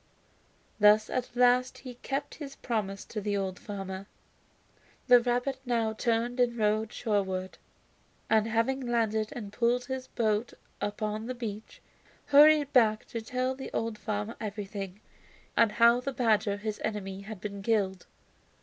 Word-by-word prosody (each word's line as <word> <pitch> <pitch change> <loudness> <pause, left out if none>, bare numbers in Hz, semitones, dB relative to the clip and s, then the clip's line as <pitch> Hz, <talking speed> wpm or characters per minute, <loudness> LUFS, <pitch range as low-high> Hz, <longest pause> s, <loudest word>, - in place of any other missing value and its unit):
Thus 210 +1 +5
at 250 -1 -3
last 250 +1 +3
he 255 -2 -9
kept 275 +3 -4
his 275 -1 -7
promise 200 -5 -3
to 215 - -5
the 205 0 -1
old 190 -2 -3
farmer. 195 -1 -6 1.0
The 250 -1 +8
rabbit 245 +2 -1
now 230 -3 0
turned 235 +2 0
and 240 -1 +2
rowed 215 0 +1
shorewards, 190 -4 -2 0.7
and 220 0 +3
having 230 +4 +1
landed 220 -3 0
and 210 -4 -7
pulled 245 +2 +1
his 260 0 -5
boat 220 0 0 0.3
upon 215 +1 -3
the 255 - -4
beach, 220 -3 -7 0.4
hurried 295 0 +6
back 220 -4 +4
to 230 - -4
tell 255 +3 -1
the 265 0 -7
old 225 -2 -2
farmer 210 +1 -3
everything, 205 -2 -5 0.5
and 225 -2 +4
how 235 +2 +5
the 275 +2 -3
badger, 215 -4 +2
his 210 0 -5
enemy, 195 -3 -3
had 215 0 -8
been 200 0 -6
killed. 195 -3 0
220 Hz, 145 wpm, -29 LUFS, 210-245 Hz, 1.0 s, The